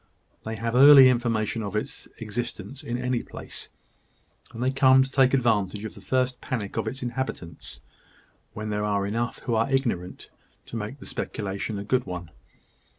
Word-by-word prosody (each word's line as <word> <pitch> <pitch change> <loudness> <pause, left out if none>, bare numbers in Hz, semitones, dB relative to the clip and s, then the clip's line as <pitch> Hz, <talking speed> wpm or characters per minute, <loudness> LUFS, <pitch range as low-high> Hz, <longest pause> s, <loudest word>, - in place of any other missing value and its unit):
They 110 0 -3
have 115 +2 -3
early 135 0 +9
information 115 -3 0
of 100 -1 -5
its 105 - -4
existence 120 +5 -5
in 120 -5 -3
any 125 -1 -1
place; - - -8 0.8
and 115 - -5
they 130 - +2
come 130 -1 +6
to 135 - -6
take 135 -2 +4
advantage 110 -5 +1
of 110 - -6
the - - -11
first 130 -1 0
panic 110 -6 -4
of - - -1
the 135 - -4
inhabitants, 120 -10 -5 0.7
where 110 - -6
there 105 -1 -2
are 100 -1 0
enough 115 +4 -2
who 120 - 0
are 115 +3 +2
ignorant 115 -10 -2 0.3
to - - -9
make 110 +4 -4
the - - -12
speculation 100 +1 -4
a 100 - -4
good 125 +3 0
one. 90 -3 -6
115 Hz, 170 wpm, -26 LUFS, 105-130 Hz, 0.8 s, early